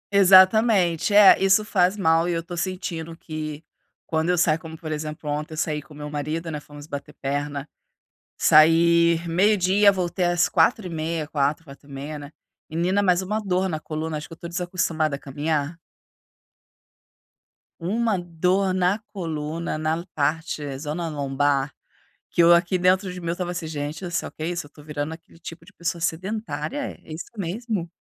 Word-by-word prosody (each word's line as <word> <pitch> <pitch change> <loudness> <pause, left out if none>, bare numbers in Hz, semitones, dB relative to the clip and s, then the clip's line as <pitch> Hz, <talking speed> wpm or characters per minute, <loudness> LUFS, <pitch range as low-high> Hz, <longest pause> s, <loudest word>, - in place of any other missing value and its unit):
Exatamente. 190 -1 +5
É, 205 -2 +8
isso 195 +2 +4
faz 190 -1 +2
mal 165 -2 +3
e - - 0
eu 165 -1 -2
tô 175 0 -7
sentindo 170 -2 -4
que, 155 -2 -6 0.4
quando 160 +1 -1
eu 180 - +2
saio, 160 -1 +3
como 160 0 -9
por 160 -1 -7
exemplo, 155 0 -5
ontem 150 +2 -3
eu - - -8
saí 150 -1 -1
com 150 0 -16
meu 150 0 -7
marido, 155 +3 -3
né, 150 - -4
fomos 145 0 -12
bater 145 -2 -7
perna. 145 +1 -3 0.7
Saí 170 +2 +5
12:00, 195 +3 +4
voltei 180 -1 -1
às 175 0 +3
4:30, 165 -4 +1
4:00, 150 +1 -1
4:30, 140 +1 -8
né? 145 0 -9 0.4
Menina, 180 +5 +1
mais 180 -2 +3
uma 210 +3 -2
dor 190 -2 0
na 155 -2 -3
coluna, 155 0 -4
acho 150 - -8
que 165 - -10
eu - - -20
tô 170 - -9
desacostumado 170 -3 -1
a 140 - -4
caminhar. 145 +3 -2 2.0
Uma 215 +4 0
dor 180 +3 0
na 185 +3 +1
coluna 165 -3 -4
na 160 +2 -1
parte, 150 -2 -2
zona 155 +4 -4
lombar, 140 -1 0 0.6
que 170 - +3
eu 170 +1 +7
aqui 175 +2 +2
dentro 185 +1 +2
de 180 - -7
mim, 170 - -5
eu 170 - -1
tava 180 -1 -3
assim: 170 -2 -5
"Gente, 150 +3 -5
olha 175 - -4
só, 175 - -2
que 155 - -7
isso? 175 -1 -3
Eu - - -18
tô 150 - -16
virando 150 +1 -4
aquele 165 0 -17
tipo 165 0 -10
de 205 - -17
pessoa 170 -1 -3
sedentária? 215 - -3
É 155 - -11
isso 160 - -6
mesmo?" 200 -1 -3
165 Hz, 170 wpm, -24 LUFS, 155-180 Hz, 2.0 s, É